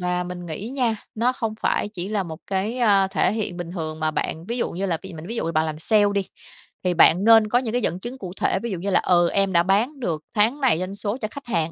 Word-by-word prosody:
và 180 0 -1
mình 175 0 -7
nghĩ 175 +7 -5
nha, 245 -4 0 0.2
nó 235 +3 +1
không 225 -4 -3
phải - - 0
chỉ 190 -3 -6
là 210 -2 0
một 160 -3 -7
cái, 200 +6 -2
ơ, 200 -5 +4
thể 195 - +2
hiện 210 -5 -3
bình 175 -1 -6
thường 160 -3 -5
mà 155 0 +1
bạn. 160 +1 -3
Ví 235 - -2
dụ - - -1
như 190 +3 -3
là 170 -4 -1
bị 190 - -9
mình 160 +1 -9
ví 230 - -5
dụ - - -1
là 165 - -2
bạn 160 0 +2
làm 155 -1 -4
sale 205 +5 +3
đi, 200 -1 -1 0.6
thì 180 -1 +1
bạn 175 +2 +5
nên 225 -1 +6
có 245 - +3
những 245 -3 -3
cái 245 - +1
dẫn 180 -4 -1
chứng 240 +6 -7
cụ 185 -7 -7
thể, 190 - +1
ví 235 - -3
dụ 185 - -3
như 200 - -3
là, 195 - +4
ừ, 175 -1 +3
"em 195 -1 +1
đã 170 0 +5
bán 220 +10 +1
được 160 -10 -2
tháng 225 +7 +3
này 245 -11 +3
doanh 185 +2 -4
số 205 +3 -3
cho 215 - -1
khách 280 -1 -9
hàng 165 -8 -1
195 Hz, 290 wpm, -23 LUFS, 175-225 Hz, 0.6 s, nên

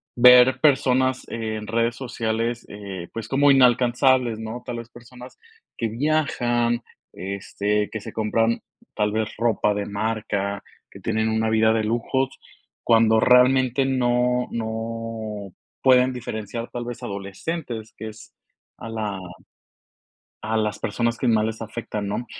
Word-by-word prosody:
ver 125 +1 +7
personas 130 -3 +3
en 110 -2 -4
redes 115 +1 0
sociales, 115 -2 -2
eh, 100 -4 -7
pues, 115 - -5
como 140 +1 +4
inalcanzables, 125 -2 +4
¿no? 110 +2 -6
Tal 120 -1 -4
vez 115 0 -8
personas 125 +1 -13 0.4
que 115 -2 -1
viajan, 120 -3 0 0.3
este, 100 +2 -2
que 110 - -4
se - - -9
compran 115 +1 +1 0.3
tal 105 0 +1
vez 110 0 0
ropa 110 -2 +1
de 100 0 -2
marca, 100 -1 -2 0.3
que - - -13
tienen 110 0 0
una 110 0 +1
vida 110 0 +4
de 110 -1 +1
lujos, 120 +4 0 0.5
cuando 115 -1 +4
realmente 125 +1 +4
no 125 -1 +1
no 110 -2 -5 0.3
pueden 130 0 +5
diferenciar 115 -1 -5
tal 120 -1 -5
vez 120 -1 -7
adolescentes, 110 - -5
que 110 - -6
es 110 +1 -14 0.4
a - - -8
la 105 -3 -3 1.2
a 110 +1 -1
las 105 -1 0
personas 115 +2 -1
que 130 - -1
más 110 -2 +3
les 110 0 -3
afectan, 110 -2 -5
¿no? 110 +4 -3
115 Hz, 135 wpm, -23 LUFS, 110-125 Hz, 1.2 s, ver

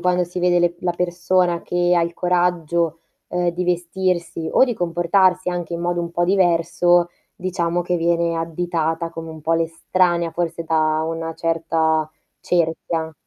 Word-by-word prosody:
quando 180 0 +2
si 175 +1 -7
vede 175 0 +3
le 175 0 +1
la 175 - 0
persona 175 0 0
che 175 0 +1
ha 170 - +3
il 170 0 -2
coraggio, 170 -2 0 0.3
uhm, 180 0 0
di 175 +1 -2
vestirsi 175 -1 -1
o - - +5
di 245 -3 -2
comportarsi 180 +1 +2
anche 175 -1 -3
in 170 - -3
modo 175 0 -1
un 170 0 -4
po' 175 0 0
diverso, 175 -1 +3 0.3
diciamo 175 -1 -1
che 175 0 -1
viene 170 0 +1
additata 165 0 -2
come 165 -1 -7
un 160 -1 -10
po' 165 +2 +1
l'estranea 170 +1 +1
forse 165 0 -3
da 155 -1 +1
una 165 0 -3
certa 160 -1 0 0.3
cerchia. 165 -1 -1
170 Hz, 160 wpm, -21 LUFS, 165-175 Hz, 0.3 s, o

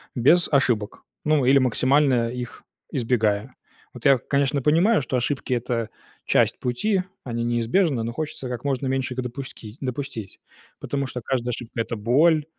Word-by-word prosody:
без 155 +8 +4
ошибок, 120 -7 +1 0.2
ну, 150 -3 +3
или 135 +2 +6
максимально 130 -1 +3
их 125 -1 -7 0.3
избегая. 115 -1 0 0.4
Вот 125 +1 -12
я, 135 -1 +7
конечно, 140 +2 0
понимаю, 165 - +4
что 130 - -1
ошибки- 130 +1 -1
это 120 -2 -1 0.4
часть - - +2
пути, 185 - 0 0.2
они 120 -2 -2
неизбежны, 120 +3 +1
но 115 - -3
хочется 150 -2 -4
как 125 -1 -5
можно 135 -1 -1
меньше 130 -1 -1
их 130 - -1
допускить 125 -3 -8
допустить. 130 -6 -5 0.4
Потому 140 -1 -2
что 125 -1 -5
каждая 125 0 -2
ошибка- 115 0 -4
это 115 - -3
боль, 150 +8 +3
130 Hz, 155 wpm, -24 LUFS, 120-140 Hz, 0.4 s, я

